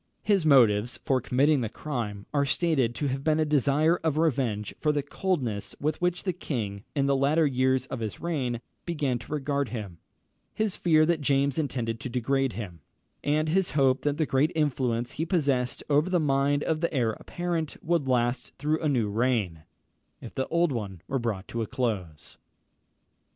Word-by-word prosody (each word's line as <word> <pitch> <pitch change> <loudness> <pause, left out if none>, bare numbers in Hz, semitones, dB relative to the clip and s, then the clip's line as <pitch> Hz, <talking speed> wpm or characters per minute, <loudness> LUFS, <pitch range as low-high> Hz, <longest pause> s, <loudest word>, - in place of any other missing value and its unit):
His 195 -6 +2
motives 120 -5 +4
for 130 -2 +2
committing 135 +4 +2
the 115 - -2
crime 115 -7 -4
are 140 -1 +3
stated 140 -5 +1
to 145 - -1
have 135 +1 -3
been 155 0 +2
a 155 - +3
desire 150 +3 +3
of 160 -3 -1
revenge 130 -10 0
for 150 - +2
the 145 -1 -1
coldness 140 - -2
with 150 +3 -1
which 180 0 0
the 185 - -1
king, 105 - -4
in 140 -1 +2
the 140 0 +3
latter 145 +4 +3
years 130 -1 +2
of 130 - -5
his 110 -3 -4
reign, 130 -8 -2 0.2
began 145 -8 -1
to 115 - -12
regard 140 -2 -1
him; 100 -8 -6 0.6
his 215 -3 0
fear 155 -3 +4
that 165 -1 +1
James 140 +1 +2
intended 120 -6 -2
to 130 - -5
degrade 130 +1 0
him; 95 -5 -7 0.4
and 155 +2 +1
his 180 -2 +1
hope 135 -1 +3
that 145 +1 0
the 155 - +1
great 140 +4 +2
influence 125 -5 0
he 155 - -3
possessed 140 -8 0
over 150 +4 +3
the 180 -1 +2
mind 140 -1 +2
of 160 -1 -1
the 170 - 0
heir 120 -6 +1
apparent 170 -3 -3
would 165 -4 +1
last 120 0 0
through 155 +2 0
a 155 - +1
new 120 -6 +1
reign, 105 -7 0 0.5
if - - -10
the 130 - -2
old 170 -1 +2
one 100 -8 -5
were 135 -1 -1
brought 110 -5 -3
to 115 - -3
a 110 - -2
close. 95 - -3
135 Hz, 185 wpm, -27 LUFS, 120-155 Hz, 0.6 s, motives